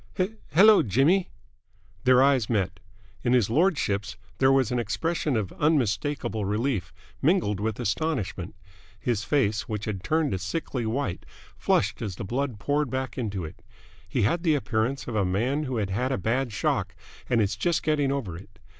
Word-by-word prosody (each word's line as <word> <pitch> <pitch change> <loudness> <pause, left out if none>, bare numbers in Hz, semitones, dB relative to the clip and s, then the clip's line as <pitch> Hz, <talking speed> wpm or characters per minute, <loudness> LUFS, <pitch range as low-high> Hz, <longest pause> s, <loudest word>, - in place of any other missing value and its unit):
"H 185 +2 +1 0.2
hello, 210 +4 +7
Jimmy!" 150 - +2 0.8
Their 130 0 +6
eyes 135 -6 +3
met. 95 -5 0 0.4
In 120 - +2
his 115 -4 +3
lordship's 115 - +1 0.2
there 135 0 +5
was 135 -3 +3
an 125 - +1
expression 125 - -1
of 100 -4 -2
unmistakable 135 -5 0
relief, 105 +2 -1 0.3
mingled 145 - +2
with 110 0 -2
astonishment. 105 - -2 0.4
His 115 -4 -1
face, 115 -5 0
which 105 -1 -3
had 100 -4 -4
turned 155 - +1
a 95 - -1
sickly 120 - -3
white, 115 -5 -2 0.3
flushed - - +1
as 100 -6 -3
the - - -6
blood 125 +2 -2
poured 145 +6 0
back 130 +1 -3
into 100 -8 -3
it. 80 - -11 0.5
He - - 0
had 165 +12 +1
the 160 -3 +3
appearance 125 0 -1
of 120 - -4
a 105 - +2
man 120 +11 0
who 130 -3 -3
had 100 -3 -1
had 125 +7 -1
a 130 - 0
bad 120 +2 -1
shock 105 - -1 0.3
and 120 - +3
is 100 -2 +1
just 170 +8 0
getting 145 -3 +1
over 120 -12 -3
it. 90 - -13
120 Hz, 170 wpm, -26 LUFS, 105-145 Hz, 0.8 s, hello